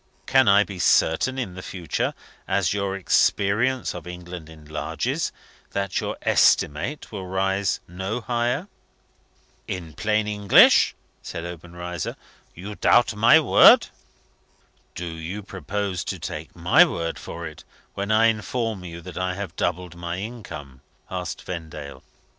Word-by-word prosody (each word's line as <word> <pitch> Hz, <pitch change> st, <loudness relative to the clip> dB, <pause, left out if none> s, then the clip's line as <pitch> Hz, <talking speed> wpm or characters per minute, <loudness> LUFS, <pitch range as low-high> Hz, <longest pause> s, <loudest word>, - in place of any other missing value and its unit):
Can 130 Hz, -3 st, +4 dB
I 100 Hz, +1 st, +6 dB
be 95 Hz, -3 st, -9 dB
certain, 90 Hz, +9 st, +3 dB
in 115 Hz, -9 st, -3 dB
the 90 Hz, -, -8 dB
future, 90 Hz, -4 st, -3 dB, 0.3 s
as 95 Hz, -2 st, +1 dB
your 100 Hz, -1 st, -1 dB
experience 105 Hz, +6 st, +2 dB
of 90 Hz, -1 st, -8 dB
England 90 Hz, -2 st, -8 dB
enlarges, 75 Hz, -1 st, -3 dB, 0.4 s
that 100 Hz, -1 st, -1 dB
your -, -, -4 dB
estimate 100 Hz, -, +2 dB
will 95 Hz, -4 st, -6 dB
rise 95 Hz, +1 st, 0 dB
no 95 Hz, +6 st, -4 dB
higher?" 120 Hz, -, -1 dB, 1.0 s
"In 85 Hz, -4 st, -5 dB
plain 110 Hz, +3 st, 0 dB
English," 105 Hz, -1 st, +5 dB, 0.3 s
said 85 Hz, -, -6 dB
Obenreizer, 85 Hz, 0 st, -6 dB, 0.4 s
"you 100 Hz, +5 st, -7 dB
doubt 120 Hz, +3 st, +4 dB
my 115 Hz, +9 st, +6 dB
word?" 150 Hz, -, +7 dB, 1.1 s
"Do 90 Hz, -, -4 dB
you 85 Hz, +5 st, -6 dB
purpose 95 Hz, 0 st, -3 dB
to -, -, -3 dB
take -, -, -7 dB
my -, -, +6 dB
word 85 Hz, 0 st, -2 dB
for 85 Hz, 0 st, -7 dB
it 80 Hz, -1 st, -9 dB, 0.3 s
when 100 Hz, +2 st, -3 dB
I 110 Hz, +1 st, +5 dB
inform 110 Hz, -1 st, -1 dB
you 85 Hz, -1 st, -8 dB
that 90 Hz, +1 st, -7 dB
I 90 Hz, 0 st, -1 dB
have 95 Hz, -4 st, -6 dB
doubled 90 Hz, 0 st, -2 dB
my 85 Hz, 0 st, -4 dB
income?" 85 Hz, -, -8 dB, 0.3 s
asked 90 Hz, -4 st, -4 dB
Vendale. 80 Hz, -6 st, -7 dB
95 Hz, 135 wpm, -24 LUFS, 85-105 Hz, 1.1 s, word